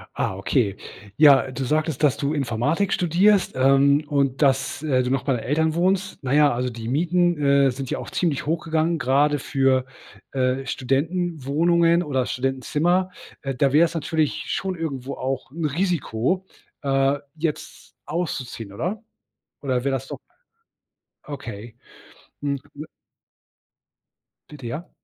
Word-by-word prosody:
Ah, 95 - -1
okay. 100 +1 0 0.4
Ja, 140 -3 +6
du 135 +1 -4
sagtest, 155 +1 -1
dass 145 - +4
du 140 +2 -1
Informatik 145 - 0
studierst, 185 +3 +3
ähm, 135 +3 +4
und 140 -1 0
dass, 135 0 +1
äh, 130 -4 +2
du 125 - -2
noch 135 -1 0
bei 135 - +1
deinen 115 - -3
Eltern 160 +3 +1
wohnst. 190 +3 0
Na 130 +1 -1
ja, 150 -1 +5
also 125 +1 -1
die 115 -1 -7
Mieten, 175 +4 +2
äh, 140 -1 +4
sind 135 +1 -6
ja - - -2
auch - - -7
ziemlich 155 -7 -1
hochgegangen, 160 +1 0
gerade 145 +2 +2
für, 135 -1 +1 0.5
äh, 130 0 0
Studentenwohnungen 165 +4 +1
oder 135 -5 -1
Studentenzimmer. 150 +9 0 0.3
Äh, 135 -2 -3
da 135 +1 +2
wär's 165 +3 +4
natürlich 160 -2 -1
schon 190 -1 -2
irgendwo 140 -5 -4
auch 130 0 -4
'n 165 +1 -3
Risiko, 175 - -1 0.4
äh, 135 0 +1 0.2
jetzt 155 -1 -5
auszuziehen, 130 - -4
oder? 190 - -3 0.6
Oder 130 -3 -1
wäre 140 -1 0
das 135 +1 -5
doch - - -7 1.1
Okay. 115 -5 -8 0.7
Hm, 140 -1 -1 0.2
m 150 +2 -7 1.6
Bitte 140 -5 -9
ja. 155 +10 -6
140 Hz, 140 wpm, -23 LUFS, 130-165 Hz, 1.6 s, Ja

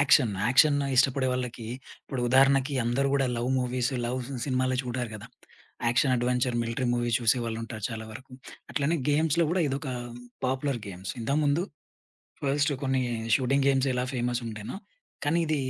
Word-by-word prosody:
Action, 135 -5 +5 0.2
action 145 +4 +5 0.2
ఇష్టపడే 135 0 +3
వాళ్ళకి 125 -2 -4 0.4
ఇప్పుడు 130 - -4
ఉదాహరణకి 135 +1 +4
అందరూ 135 +4 +1
గూడా 135 -1 +2
లవ్ 120 +2 -1
మూవీస్, 125 +1 -1
లవ్ 125 +2 -2 0.2
సినిమాలే 130 -1 0
చూడరు 125 -2 -3
గదా! 110 - -8 0.6
యాక్షన్, 130 +3 +3
అడ్వెంచర్, 125 0 0
మిలిటరీ 115 +2 -2
మూవీ 120 0 0
చూసేవాళ్ళుంటారు 115 -2 -1
చాలా 110 -1 -5
వరకు. 130 +4 -11 0.4
అట్లనే 150 +4 +1
గేమ్స్‌లో 155 +3 +3
గూడా 180 +2 +1
ఇదొక 135 +2 -3 0.6
పాపులర్ 130 0 -1
గేమ్స్. 95 -1 -6
ఇంతకుముందు 145 +6 +1 0.8
ఫస్ట్ 145 +1 +1
కొన్ని 130 -1 +1 0.3
షూటింగ్ 135 +1 +2
గేమ్స్ 135 0 +2
ఎలా 125 0 0
ఫేమస్ 120 0 -1
ఉంటేనో 110 - -6 0.5
కానీ 155 +4 +2
ఇది 155 0 +1
130 Hz, 140 wpm, -28 LUFS, 120-140 Hz, 0.8 s, యాక్షన్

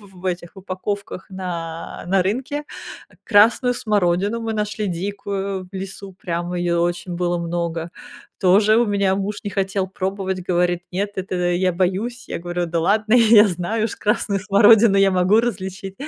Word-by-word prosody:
в 180 - -15
в - - -16
этих 175 +1 -4
упаковках 190 +1 -5
на, 170 -3 -6
на 195 +1 +3
рынке. 270 +8 -2 0.6
Красную 230 +4 +4
смородину 205 0 0
мы 225 -1 -3
нашли 210 0 -2
дикую 195 +1 -4
в 195 - -19
лесу, 195 0 -7
прямо 175 0 -4
её 175 -1 0
очень 175 +1 -2
было 175 0 -1
много, 170 -1 -3 0.5
тоже 205 +4 +4
у 240 +1 +3
меня 200 -2 +1
муж 200 +1 -3
не 205 - -3
хотел 195 -1 -1
пробовать, 190 0 -3
говорит: 175 -1 +1
"Нет, 200 +3 -2
это, 190 0 -3
я 180 +1 +1
боюсь." 195 +7 -2
Я - - -4
говорю: 175 0 -3
"Да 165 0 -1
ладно, 215 +6 +2
я 225 -3 +7
знаю 195 +4 -2
уж 225 - -3
красную 205 -1 0
смородину 205 +1 +5
я 195 -1 +4
могу 185 +4 +3
различить." 195 -4 -4
190 Hz, 160 wpm, -21 LUFS, 180-210 Hz, 0.6 s, я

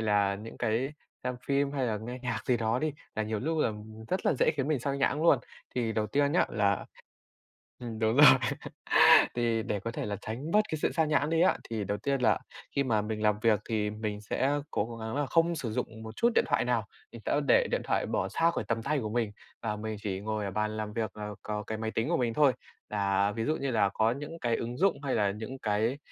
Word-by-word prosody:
là 105 -2 +2
những 105 +3 -9
cái 120 +4 0 0.3
xem 125 0 -2
phim, 140 0 +1
hay 135 -3 0
là 110 -2 0
nghe 120 +4 -6
nhạc 115 -3 -3
gì 125 - +3
đó 115 +1 0
đi, 155 0 -1 0.2
là 110 - 0
nhiều 110 0 -2
lúc 160 +4 -1
là 130 - +2 0.4
rất 185 - -1
là - - +4
dễ - - +4
khiến 135 0 -1
mình 150 -5 +1
sao 140 +2 -1
nhãng 140 +2 +1
luôn. 170 - +6 0.4
Thì 115 -3 0
đầu 110 -1 0
tiên 145 +6 +1
nhá 175 - +3
là 100 -2 +1 1.0
ừm, 115 -3 -6
đúng 110 +1 +1
rồi, 150 - +9 1.1
thì 115 -2 +1
để 105 - -2
có 115 +4 -4
thể - - -4
là 105 -1 -2
tránh 130 +9 -5
bớt 210 - +5
cái 155 - -2
sự - - +1
sao 160 - +2
nhãng 150 -1 +1
đi 165 0 +2
á 185 - +4
thì 110 -2 -2
đầu 100 +1 -2
tiên 140 +3 -1
là 110 -3 +3 0.4
khi 140 - +3
mà 110 -5 +1
mình 105 0 -4
làm 105 -1 +2
việc 110 -3 +4
thì 105 -2 0
mình 105 -1 -4
sẽ 130 +6 0 0.2
cố 115 +2 -2
gắng 110 +2 -5
là 145 0 +1
không 165 +4 +2
sử 130 -8 -3
dụng 110 0 -4
một 110 0 -8
chút 235 - +3
điện - - +5
thoại - - +1
nào. - - +1 0.3
Mình - - -10
sẽ - - +2
để - - +5
điện - - +1
thoại - - 0
bỏ - - -1
xa 165 +1 +2
khỏi - - -2
tầm 115 0 0
tay 145 +3 0
của 110 -4 -3
mình 115 -2 -1 0.3
và 105 -2 -2
mình 110 0 -4
chỉ 95 -3 -3
ngồi 110 0 -2
ở 100 - -3
bàn 105 +2 -1
làm 105 -1 -4
việc 110 -3 -3
là 105 0 -5
có 105 0 -4
cái 110 +1 -4
máy 110 0 -3
tính 115 +1 -1
của - - +2
mình 120 -2 0
thôi. 140 0 +4 0.4
Là 100 -1 +1
ví 115 +2 -3
dụ 155 - +1
như 135 -1 -2
là 105 -4 +3
có 110 +1 +2
những 145 +6 -6
cái 120 -1 +1
ứng 120 +1 -4
dụng 190 +1 +3
hay 135 - 0
là 100 -3 +2
những 110 +6 -7
cái 110 +5 0
115 Hz, 255 wpm, -29 LUFS, 105-140 Hz, 1.1 s, rồi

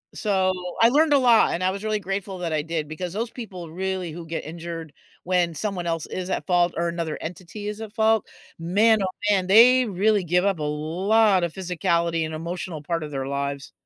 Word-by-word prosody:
So, 190 -3 +1 0.3
I 230 - +7
learned 300 +4 +4
a 280 - +6
lot 240 -4 +5
and 175 - -2
I 185 - +3
was 195 +2 -5
really 215 -1 0
grateful 195 0 -4
that 170 -2 -3
I 155 -1 0
did 160 -2 -3
because 170 +3 -5
those 225 +3 -2
people 185 -9 -8
really 185 -1 -3
who 170 +1 -8
get 165 0 -4
injured 165 0 -7 0.3
when 175 -2 +1
someone 185 0 -3
else 165 -2 -2
is 185 0 -5
at - - -2
fault 175 -1 +3
or 170 0 0
another 170 -2 -3
entity 180 +5 -7
is 210 0 -5
at 220 -2 -8
fault, 220 -1 +2 0.3
man, 205 +6 +3
oh, - - 0 0.2
man, 195 -3 +3
they 245 +6 +7
really 205 0 +1
give 180 +2 +1
up 195 -3 +1
a 155 - -4
lot 185 +7 +2
of 170 -2 -2
physicality 170 -3 0
and 155 - -6
emotional 170 0 -5
part 165 +2 -2
of 150 - -7
their 135 -1 -3
lives. 140 0 -3
180 Hz, 210 wpm, -24 LUFS, 165-205 Hz, 0.3 s, I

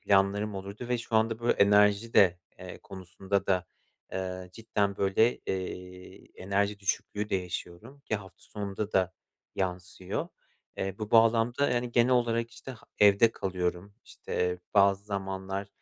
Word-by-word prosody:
planlarım 100 +1 +2
olurdu 100 +5 -7
ve 125 -1 +1
şu 115 -1 -1
anda 110 +1 +1
böyle 120 - +3
enerji 105 +2 +4
de, 90 -3 +5 0.2
eee, - - -9
konusunda 95 +1 -3
da, 90 -2 +1 0.5
eee, 95 -1 -4
cidden 105 -2 -1
böyle, 100 +5 +3
eee, 90 -1 -6 0.2
enerji 100 +2 0
düşüklüğü 105 +1 -2
de 95 - +2
yaşıyorum 90 +8 -7
ki 125 - -3
hafta 95 -2 -13
sonunda 100 0 -5
da 95 -1 +2 0.4
yansıyor. 90 0 -3 0.5
Eee, 95 +1 -3
bu 105 0 -5
bağlamda, 115 +4 +4
yani, 120 -1 -1
genel 120 +1 +4
olarak 115 -1 +1
işte 120 +3 -10
h - - -11 0.2
evde 105 +2 +6
kalıyorum, 90 +1 -3
işte 90 0 -3 0.2
bazı 100 0 +4
zamanlar 95 -1 -4
100 Hz, 140 wpm, -29 LUFS, 95-110 Hz, 0.5 s, evde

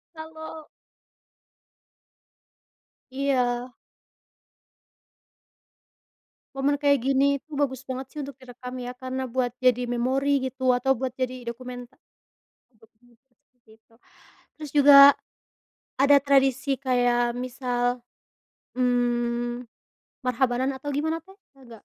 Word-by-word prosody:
Kalau 315 0 -9 2.4
Iya. 255 -2 -1 2.8
Momen 280 +1 0
kayak 285 -2 +3
gini 270 +1 +2 0.2
itu 315 - -33
bagus 265 -2 -1
banget 260 0 -5
sih 300 - -7
untuk 280 -2 -8
direkam 250 0 -10
ya, 245 0 -5
karena 260 0 -5
buat 250 0 -1
jadi 250 -1 +3
memori 270 +4 +1
gitu 260 0 0
atau 260 +2 +2
buat 255 +1 -3
jadi 255 -1 -4
dokumenter 245 0 -10 0.8
dokumenter 230 +3 -27 0.2
seperti 235 -3 -29
itu. 230 0 -30 0.6
Terus 300 -3 -8
juga, 285 -1 +8 1.0
ada 280 +1 +5
tradisi 270 0 +2
kayak 245 -2 +1
misal, 245 -1 -2 0.7
mmm, 240 -1 0 0.6
Marhabanan 255 +1 0
atau 290 +2 -6
gimana, 315 +3 -1
Teh? 385 - -17 0.2
Ada - - -19
enggak? 235 -1 -12
255 Hz, 100 wpm, -25 LUFS, 245-275 Hz, 2.8 s, juga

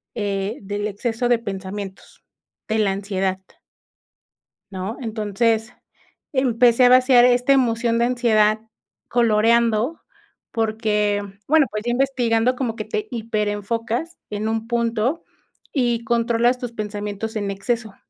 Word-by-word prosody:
eh, 205 +1 -2
del 205 +1 -3
exceso 225 +3 -2
de 240 -1 +3
pensamientos, 195 -2 -7 0.4
de 220 0 0
la 205 -2 +2
ansiedad. 195 -1 -2 1.3
¿No? 190 +4 -5
Entonces, 225 0 -1 0.6
empecé 250 -2 +4
a - - +8
vaciar 255 -1 +6
esta 250 +2 +4
emoción 235 -3 +2
de 235 - +3
ansiedad 220 -3 +2 0.5
coloreando 235 +3 +2 0.5
porque, 215 -2 0 0.3
bueno, 310 -1 +5
pues 215 0 -4
ya 240 - 0
investigando, 250 -2 +1
como 245 -4 -2
que 215 - -4
te 430 - -3
hiperenfocas 230 - -2
en 210 +1 -2
un 225 0 -2
punto 235 +5 0 0.5
y 240 -4 +1
controlas 235 +1 +2
tus 245 -1 -5
pensamientos 210 0 -5
en 205 -2 -2
exceso. 220 +2 -3
225 Hz, 120 wpm, -22 LUFS, 210-240 Hz, 1.3 s, a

